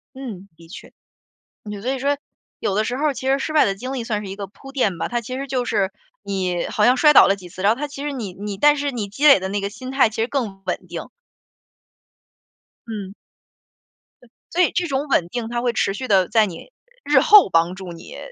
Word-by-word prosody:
嗯， 220 -8 -8
的 165 - -16
确。 165 - -11 0.8
就 205 -1 -6
所 255 - -1
以 270 - -3
说， 280 +2 0 0.4
有 195 - -1
的 215 - +1
时 245 - -2
候 295 +1 +1
其 260 0 -5
实 270 +1 +3
失 310 - -3
败 310 - +5
的 195 - 0
经 255 +6 -6
历 260 -3 -3
算 210 -2 -2
是 190 - -7
一 - - -5
个 200 -1 -5
铺 270 +8 -14
垫 210 -10 0
吧， - - -2
它 240 0 -1
其 255 +3 -6
实 275 - -4
就 255 -2 -1
是 195 -5 0 0.3
你 185 -3 -2
好 210 - 0
像 250 +3 +5
摔 300 +3 +6
倒 - - +8
了 195 - +2
几 185 -2 -12
次， 185 +2 -9
然 205 - +5
后 235 - -5
它 295 - -1
其 280 -1 -8
实 295 - -2
你 220 -8 -5
你 200 +1 -6
但 295 +5 +5
是 285 0 -1
你 225 -6 -4
积 245 +10 0
累 280 - +9
的 190 0 -4
那 200 +1 -2
个 200 0 -3
心 255 +4 -8
态 270 -3 +4
其 215 - -10
实 - - +1
更 220 -8 -3
稳 180 - -3
定。 - - -5 1.9
嗯。 200 -4 -6 1.1
对， 245 - -20 0.2
所 355 - +1
以 360 - +3
这 350 -1 0
种 280 +1 -2
稳 180 -11 +2
定 235 +3 -4
它 240 0 -2
会 240 -1 0
持 195 -3 0
续 255 +6 -5
地 190 -5 +4
在 220 -1 +3
你 185 - -9 0.3
日 290 -2 +4
后 410 +8 +7
帮 165 +2 +2
助 190 -1 -8
你 170 - -11
230 Hz, 260 characters per minute, -21 LUFS, 195-270 Hz, 1.9 s, 累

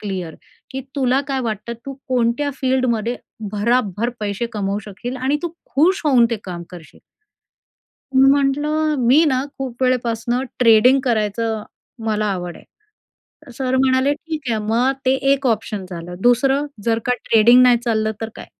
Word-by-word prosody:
Clear, 185 -6 -5 0.4
की 265 -1 -4 0.2
तुला 260 -1 +2
काय 270 -1 -1
वाटतं? 220 -1 -4
तू 275 - -4 0.2
कोणत्या 255 +3 +1
फील्डमध्ये 245 -3 0 0.4
भराभर 215 0 0
पैसे 210 +2 -2
कमवू 200 -1 -2
शकशील? 240 +5 -6
आणि 265 +3 0
तू 345 - -1 0.3
खुश 345 +7 +3
होऊन 255 -5 +5
ते 230 - 0
काम 175 -2 -6
करशील?" 175 -3 -13 1.1
मी 265 +1 +6
म्हटलं, 295 +3 +1
"मी 260 +7 +4
ना 260 -2 +1
खूप 260 -2 -5
वेळेपासून 245 0 0
ट्रेडिंग 250 +3 +5
करायचं 220 -1 -1 0.4
मला 215 -1 0
आवड 175 -2 -5 0.5
आहे." 290 -5 -20
सर 260 -1 0
म्हणाले, 260 +1 +3
"ठीक 315 +1 -6
आहे. 225 - 0
मग 240 +5 +2
ते 260 - +4 0.2
एक 275 -1 0
ऑप्शन 215 -4 -1
झालं. 175 0 -7
दुसरं? 270 +4 +3 0.2
जर 230 -1 +1
का 250 - +2
ट्रेडिंग 235 +3 +6
नाही 250 -1 +6
चाललं, 220 -2 -1
तर 225 - -3
काय?" - - -9
245 Hz, 150 wpm, -20 LUFS, 215-265 Hz, 1.1 s, मी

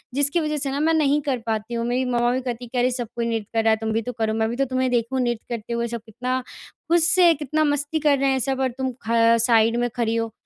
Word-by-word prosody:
जिसकी 285 +4 +2
वजह 305 -2 -1
से 275 -1 -2
न 280 +2 -2
मैं 325 +1 +3
नहीं 295 -2 +2
कर 275 -3 -1
पाती 220 +1 -3
हूँ। 230 0 -2
मेरी 250 +2 0
मम्मा 240 0 +2
भी 255 - -1
कहती 245 -1 -5
कि 250 - -6
अरे 250 +1 +2
सब 240 -2 -3
कोई 235 -1 -2
नृत्य 225 -3 -3
कर 225 -1 +1
रहा 225 - +3
है - - +4
तुम 220 - -2
भी 225 - 0
तो 250 - -5
करो 220 -1 0
मैं 220 0 0
भी 235 - -3
तो 275 +2 +1
तुम्हें 255 0 -1
देखूँ 240 +2 0
नृत्य 240 -2 -2
करते 230 +1 -6
हुए। 235 0 -1
सब 235 -1 -5
कितना 250 +4 -3 0.5
खुश 340 -1 +5
से 355 -1 +5
कितना 305 +1 -1
मस्ती 290 +1 0
कर 295 -2 +3
रहे 275 0 +2
हैं 265 - +1
सब 265 +1 -1
और 260 - +1
तुम 260 -1 -2 0.2
ख 230 0 +4
साइड 230 -1 +3
में 245 0 0
खड़ी 230 -2 0
हो। 230 -1 -2
245 Hz, 285 wpm, -23 LUFS, 230-275 Hz, 0.5 s, खुश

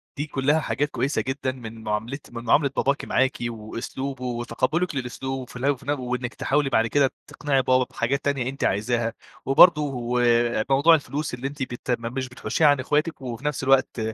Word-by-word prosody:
دي 145 - -2
كلها 145 +2 +1
حاجات 145 -1 -1
كويسة 140 +2 -1
جدًا 130 0 -2
من 115 -3 -10
معاملة 110 +6 -3
من 115 -1 -7
معاملة 140 +5 +3
باباكِ 140 +1 0
معاكِ 130 +1 +1
وأسلوبه 125 +4 -6
وتقبلك 125 +8 -1
للأسلو 130 0 -4
وفي 125 0 -9
وفي 140 -2 -2
نف 145 -1 0
وإنك 125 -1 -3
تحاولي 145 0 0
بعد 115 -3 +2
كده 140 +2 +2 0.2
تقنعي 140 -2 0
بابا 130 0 +3
بحاجات 135 +4 -1
تانية 135 -3 0
أنتِ 135 +1 -6
عايزاها، 115 +3 0 0.3
وبرضه 135 -5 +4
آآ 120 -2 +2
موضوع 145 +5 +6
الفلوس 150 -1 -3
اللي 125 +2 -3
أنتِ 140 -1 -5
بت 125 0 -5
ما 115 0 -4
مش 130 +1 -4
بتحوشيها 125 +5 +1
عن 145 -2 +4
اخواتِك، 150 +4 0
وفي 125 +1 -6
نفس 150 -3 -1
الوقت 135 -1 +3
130 Hz, 180 wpm, -24 LUFS, 120-140 Hz, 0.3 s, موضوع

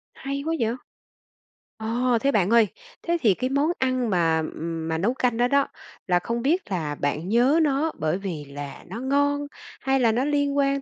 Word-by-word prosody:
Hay 275 +1 -4
quá 325 - 0
vậy! 230 0 0 1.0
Ồ, 235 +2 +1
thế 275 - +2
bạn 195 -4 +2
ơi, 230 -2 +5 0.4
thế 340 0 +1
thì 215 -6 +5
cái 255 +7 -2
món 285 +5 +2
ăn 255 -3 +1
mà, 165 -3 +2
ừm, 165 0 -4
mà 160 - -1
nấu 205 +9 +1
canh 245 -3 0
đó 245 - +3
đó, 280 +2 +2 0.4
là 180 -1 +3
không 235 +5 -3
biết 320 - 0
là 155 -5 -2
bạn 150 +5 -2
nhớ 250 +8 +4
nó 295 +2 +1
bởi 155 +3 0
vì 175 -7 -5
là 140 0 -8
nó 215 +6 -6
ngon 285 +2 +1 0.3
hay 270 0 +2
là 235 -3 +4
nó 245 +4 0
liên 285 -1 +1
quan 275 0 +2
240 Hz, 200 wpm, -25 LUFS, 180-275 Hz, 1.0 s, ơi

